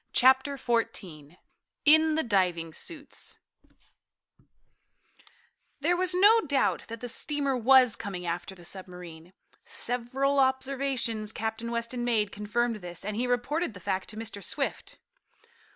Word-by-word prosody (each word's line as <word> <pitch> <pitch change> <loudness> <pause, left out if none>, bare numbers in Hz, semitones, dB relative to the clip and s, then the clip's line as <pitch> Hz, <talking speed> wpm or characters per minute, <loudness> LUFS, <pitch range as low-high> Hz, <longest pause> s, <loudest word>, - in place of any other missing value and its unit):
Chapter 265 +2 +4
Fourteen 180 - -2 0.5
In 315 +1 +6
the 320 - +1
Diving 180 -7 0
Suits 295 - -5 2.4
There 335 +5 +2
was 365 0 +1
no 420 +5 +6
doubt 280 -1 +1
that 230 0 -8
the 245 - -4
steamer 280 +2 0
was 250 -1 +6
coming 180 -3 -6
after 175 +3 -4
the 175 -2 -10
submarine. 180 -3 -7 0.3
Several 260 +4 -1
observations 265 -4 0
Captain 225 +1 -4
Weston 235 +1 -3
made 220 -4 +1
confirmed 230 +3 -1
this, 175 -2 -6
and 210 0 -3
he 245 +3 -1
reported 245 +2 -1
the - - -9
fact 190 +1 -3
to 215 - -7
Mr. 220 -3 -5
Swift. - - -3
235 Hz, 125 wpm, -28 LUFS, 200-270 Hz, 2.4 s, In